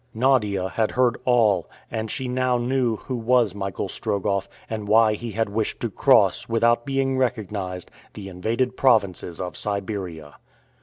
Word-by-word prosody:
Nadia 110 -7 +2
had 110 +1 0
heard 125 -1 +3
all, 110 -8 +3 0.2
and 110 0 -3
she 130 +1 -3
now 125 0 +1
knew 120 -1 0
who 130 +4 -6
was 120 -3 +2
Michael 100 -2 -4
Strogoff, 100 -1 -2 0.2
and 110 -2 -5
why 110 +1 +5
he 115 +1 -6
had 115 0 0
wished 105 +2 -2
to - - -2
cross, - - +3
without 115 +2 +2
being 135 -1 0
recognized, 100 -7 -3 0.2
the 100 -2 -7
invaded 115 +8 -1
provinces 100 -10 +1
of 90 -1 -5
Siberia. 95 -7 -4
110 Hz, 150 wpm, -23 LUFS, 100-125 Hz, 0.2 s, why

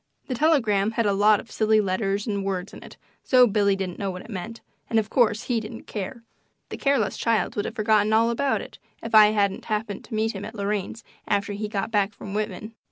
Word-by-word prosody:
The 260 - -3
telegram 225 -8 +2
had 230 -1 0
a 200 - +2
lot 205 +1 +4
of 230 - -12
silly 220 0 +3
letters 195 0 -1
and 200 -3 -2
words 190 -1 -3
in - - -10
it, - - -13 0.3
so 255 -2 +6
Billy 200 -3 +2
didn't 190 -2 -5
know 200 - -2
what 180 0 -6
it - - -12
meant, 215 +4 -6 0.3
and, 225 - +1
of 220 -1 0
course, 220 -3 +2
he 240 -3 0
didn't 225 +1 -8
care. 220 +4 -6 0.5
The - - -6
careless 265 -8 +1
child 225 -5 0
would 205 - -1
have - - -5
forgotten 215 -1 +2
all 225 +2 +3
about 270 +4 0
it - - -11 0.2
if 230 - -6
I 215 -1 +9
hadn't 200 -2 0
happened 210 -1 -3
to 225 - -6
meet 220 +1 +1
him 195 -2 -7
at 220 +2 -8
Lorraine's 205 +2 -3 0.2
after 205 0 0
he 210 +1 -4
got 205 +1 -3
back 205 -1 +1
from 195 - -8
Whitman. 215 +1 -4
215 Hz, 230 wpm, -24 LUFS, 200-225 Hz, 0.5 s, I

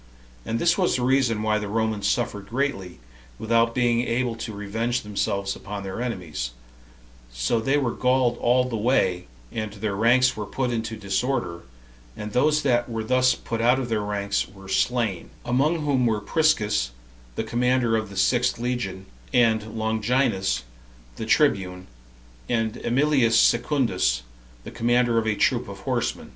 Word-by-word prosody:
And 115 - -1
this 170 +7 +2
was 180 - +2
the 125 - -1
reason 125 -4 +2
why 110 0 +1
the 105 - -4
Romans 110 -1 -1
suffered 100 -1 -1
greatly, 115 - -2 0.4
without 115 +1 +1
being 120 -2 +2
able 120 0 -1
to 115 0 -5
revenge 110 +4 -2
themselves 100 -1 -2
upon 100 0 -7
their 95 +4 -5
enemies; 85 - -4 0.8
so - - 0
they 135 +6 +1
were 130 -5 0
galled 125 -2 +1
all 125 +1 +3
the 125 -2 -4
way, 100 -6 +1 0.2
and 110 -1 -4
their 105 -3 -3
ranks 125 +4 +4
were 105 -1 -5
put 130 +1 -2
into 110 -1 -3
disorder, 100 -3 -2 0.6
and 105 0 -6
those 150 +4 +3
that 120 -3 +1
were 115 -1 -3
thus 130 +2 +3
put 115 -1 -4
out 120 +3 +4
of 130 -2 -3
their 110 -2 0
ranks 100 -1 -1
were 95 -1 -14
slain; 110 -2 0 0.2
among 150 +6 +1
whom 130 -4 +2
were 110 -2 +1
Priscus, 105 - +1 0.5
the - - -2
commander 125 -1 +1
of 110 -2 -2
the 100 - -9
sixth 125 +4 +2
legion, 115 -6 -3 0.3
and 110 -2 +2
Longinus, 110 - 0 0.5
the - - -5
tribune, 90 -1 +1 0.6
and 115 -1 0
Emilius 125 -3 +3
Secundus, 115 - +2 0.4
the - - -8
commander 120 0 +2
of 110 - -2
a 105 - +1
troop - - +1
of - - -9
horsemen. - - -2
115 Hz, 155 wpm, -24 LUFS, 105-125 Hz, 0.8 s, ranks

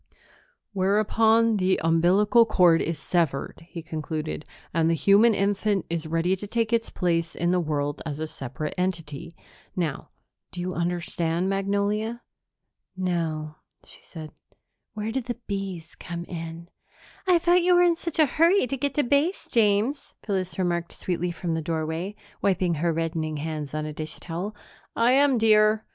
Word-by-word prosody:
"Whereupon 220 +3 +3
the 185 -1 +2
umbilical 180 +8 +4
cord 175 -6 +4
is 165 -1 -2
severed," 160 -3 -1
he 170 - -7
concluded, 155 -1 -4 0.3
"and 165 0 +2
the 165 - +3
human 205 +6 +5
infant 200 0 0
is 165 -1 -2
ready 165 +3 +1
to 205 - -7
take 230 +1 -1
its 230 -1 +1
place 170 -2 -1
in 175 +1 0
the 180 - +2
world 145 -3 -2
as 150 -2 -5
a 160 - -2
separate 140 0 -5
entity. 165 -3 -3 0.4
Now 165 -6 -3 0.4
do 180 - -8
you 180 +1 -3
understand, 175 0 -1
Magnolia?" 200 +4 -1 0.7
"No," 160 -4 -2 0.3
she - - -12
said. 155 -3 -9 0.6
"Where 215 +1 -3
do 265 +3 -1
the 240 0 -5
bees 195 -5 -5
come 170 0 -7
in?" 165 0 -7 0.6
"I 360 -1 +6
thought 350 +1 +3
you 360 +1 +4
were 355 - +6
in 345 -1 +4
such 335 -1 -5
a 310 - +6
hurry 335 +7 +3
to 270 +2 -3
get 280 0 -2
to 295 - +3
Base, 285 +9 +1
James," 225 +5 +1
Phyllis 190 -3 -2
remarked 175 -2 -1
sweetly 180 -1 -2
from 170 -1 -3
the 160 - -1
doorway, 160 +4 -3 0.3
wiping 185 -3 +1
her 170 0 +2
reddening 160 -1 -2
hands 155 -1 -4
on 155 0 -2
a 155 - -5
dish 155 +1 -4
towel. 180 +5 -5 0.4
"I 235 +2 +4
am, 275 0 +4
dear." 215 -1 +4
180 Hz, 160 wpm, -25 LUFS, 165-215 Hz, 0.7 s, I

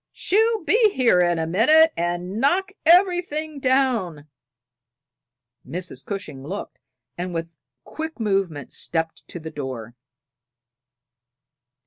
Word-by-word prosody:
"She'll 445 +1 +1
be 440 +7 +3
in 425 - +5
here 235 -8 +3
in 175 -1 +2
a 160 - -1
minute 305 - +5
and 175 +5 -2
knock 370 +8 +2 0.2
everything 340 -4 +3
down!" 245 - 0 1.4
Mrs. 180 +1 -6
Cushing 195 - -6
looked, 190 +8 -7 0.4
and 180 0 -4
with 165 0 -3
a 165 - -39 0.3
quick 315 -3 -6
movement 195 - -1
stepped 165 -1 -3
to 175 - -7
the 160 0 -8
door. 130 -6 -6
195 Hz, 115 wpm, -23 LUFS, -, 1.4 s, in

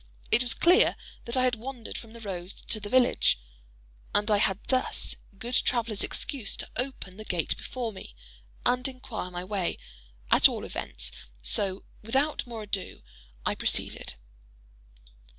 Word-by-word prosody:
It 240 - +7
was 240 -2 +4
clear 360 +7 +6 0.3
that 235 +2 -2
I 255 - +4
had 255 -1 +4
wandered 240 0 -5
from 225 -1 -7
the 230 - -10
road 185 -3 -5 0.2
to 215 - 0
the 205 0 -6
village, 250 - +4 0.8
and 210 +1 +3
I 210 - +6
had 190 -2 +3
thus 255 -1 +1 0.2
good 240 +5 -5
traveller's 230 -5 +2
excuse 255 -9 -1
to - - -4
open 245 -7 -2
the 215 - -7
gate 175 -6 0
before 245 -3 -4
me, 190 - -10 0.5
and 250 +2 +3
inquire 255 -7 -5
my 175 0 -4
way, 190 -2 -1 0.5
at - - +8
all - - -4
events; - - -2 0.3
so, 190 - 0 0.2
without 270 +6 +1
more 230 -2 -5
ado, 200 -2 -2 0.4
I - - +2
proceeded. - - 0
225 Hz, 150 wpm, -29 LUFS, 195-250 Hz, 0.8 s, at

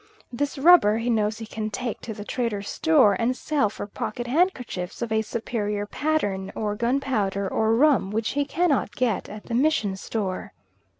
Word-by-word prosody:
This 285 +4 -2
rubber 270 -8 +6
he 235 +2 -1
knows 215 -1 +1
he 225 - -6
can 215 0 -4
take 235 +1 -4
to 235 - -6
the 205 - -8
trader's 215 -5 -2
store 295 -11 +4
and 245 +2 0
sell 290 -8 +1
for 205 - -6
pocket 215 +3 -5
handkerchiefs 250 - -1
of 230 - -4
a 220 0 +2
superior 210 -2 -3
pattern, 205 -8 -1
or 210 -1 -1
gunpowder, 225 -5 0
or 220 +3 +1
rum, 275 -6 +3
which 220 +2 -1
he 285 +1 0
cannot 285 - 0
get 235 -6 0
at 210 0 -9
the 235 - -6
mission 245 -6 +2
store. 190 -1 -4
225 Hz, 175 wpm, -25 LUFS, 210-270 Hz, -, rubber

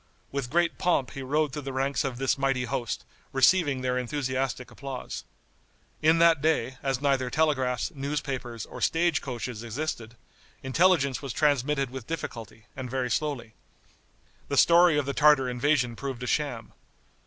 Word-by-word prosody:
With 140 -3 -3
great 170 +3 +1
pomp 165 -7 +1
he 135 - -7
rode 145 +2 0
through 150 - -4
the 135 -1 -6
ranks 135 +1 0
of 135 -3 -3
this 135 +1 +1
mighty 135 -2 0
host, 120 -1 -3 0.3
receiving 140 0 +3
their 125 0 0
enthusiastic 130 -1 -2
applause. 135 -2 -7 0.8
In 160 +2 +5
that 165 -3 +5
day, 130 -5 0
as 135 -2 -1
neither 135 -3 +1
telegraphs, 130 -3 +1
newspapers 135 -5 -4
or - - -10
stage 170 -1 +2
coaches 120 -3 -5
existed, 120 -1 -4 0.5
intelligence 140 -1 +2
was 135 -4 -5
transmitted 145 -2 +1
with 130 -3 -8
difficulty, 115 -9 -6
and 130 -2 -6
very 125 -1 -2
slowly. 125 -1 -2 0.9
The - - -2
story 170 -2 +6
of 145 - +1
the 140 - -2
Tartar 150 -3 +5
invasion 125 -1 +1
proved 130 -1 -5
a - - -4
sham. 125 -5 -2
135 Hz, 155 wpm, -27 LUFS, 125-150 Hz, 0.9 s, story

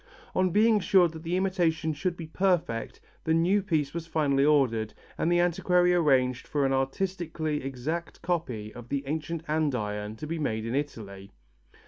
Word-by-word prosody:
On 185 0 +2
being 215 +4 +4
assured 185 -3 +4
that 160 -1 -9
the 170 +2 -1
imitation 170 -4 +1
should 175 +4 -2
be 165 - -6
perfect, 175 -8 0 0.2
the 160 - +2
new 180 +5 +3
piece 155 -7 -1
was 165 -1 -5
finally 145 -4 +2
ordered 125 -7 +2 0.2
and 170 - 0
the 175 - +4
antiquary 180 +1 +3
arranged 130 -7 +2
for 145 -2 0
an 135 - +1
artistically 155 +2 -2
exact 135 +6 -4
copy 125 -12 -2
of 120 -1 -11
the 140 -1 -1
ancient 160 +3 -3
andiron 110 -9 -1
to 150 - -7
be 165 +2 -3
made 110 -7 -1
in 115 - -3
Italy. 110 -9 -4
155 Hz, 165 wpm, -28 LUFS, 135-175 Hz, 0.2 s, being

